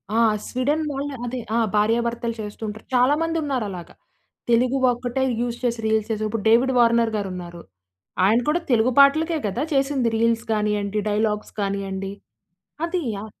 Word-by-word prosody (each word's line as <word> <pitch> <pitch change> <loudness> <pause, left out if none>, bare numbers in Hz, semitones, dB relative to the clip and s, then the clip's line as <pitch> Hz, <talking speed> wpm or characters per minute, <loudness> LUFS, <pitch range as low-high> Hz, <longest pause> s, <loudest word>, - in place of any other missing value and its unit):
ఆ! 230 - +3 0.3
స్వీడన్ 285 +5 0
వాళ్ళు 280 +1 -4
అదే, 250 +1 -4 0.2
ఆ! - - +3 0.2
భార్యాభర్తలు 230 +2 +1
చేస్తుంటరు. 215 +1 -6
చాలా 250 +3 +4
మందున్నారలాగా. 270 - -3 0.5
తెలుగు 250 +3 +3
ఒక్కటే 245 +2 -2 0.2
యూజ్ 240 -1 -2
చేసి, 235 -2 0
రీల్స్ 220 0 +1
చేసి, 215 0 -2
ఇప్పుడు 215 -1 -3
'డేవిడ్ 245 +4 +4
వార్నర్' 235 -1 +3
గారున్నారు. 180 -4 -6 0.6
ఆయన 220 +4 +4
కూడా 340 +3 +1
తెలుగు 235 +2 +3
పాటలకే 315 +4 +4
కదా 235 +8 -2
చేసింది, 270 -3 +1
రీల్స్ 230 0 +1
కానీయండి, 210 -1 0
డైలాగ్స్ 210 0 -1
కానీయండి, 195 -1 -3 0.7
అదీ 350 0 -2 0.2
ఆ - - -6
230 Hz, 140 wpm, -23 LUFS, 210-260 Hz, 0.7 s, చాలా